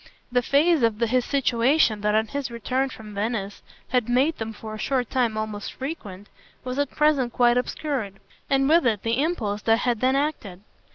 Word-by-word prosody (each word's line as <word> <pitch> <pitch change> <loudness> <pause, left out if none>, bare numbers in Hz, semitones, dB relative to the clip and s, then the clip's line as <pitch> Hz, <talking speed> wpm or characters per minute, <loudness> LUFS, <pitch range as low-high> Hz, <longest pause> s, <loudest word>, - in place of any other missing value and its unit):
The 245 0 +2
phase 295 +5 +3
of 225 -2 +1
his 240 +2 +2
situation 250 -3 +2
that 210 0 +1
on 220 0 +3
his 280 +2 -4
return 255 +3 -1
from 215 -4 -10
Venice 205 -1 -3 0.3
had 245 -2 +1
made 270 +6 +2
them 225 0 -4
for 220 0 -9
a 215 - -7
short 255 -2 -1
time 235 -4 +1
almost 215 -1 -4
frequent 215 - -7 0.4
was 255 +2 -4
at 285 -2 +1
present 295 -5 +2
quite 240 -1 +4
obscured, 250 -4 -2 0.3
and 270 0 +3
with 325 -2 +4
it 215 -4 0
the 230 +3 +1
impulse 220 -11 -1
that 225 0 +3
had 240 -2 0
then 260 +1 +3
acted. 250 -10 -3
245 Hz, 185 wpm, -24 LUFS, 215-275 Hz, 0.4 s, quite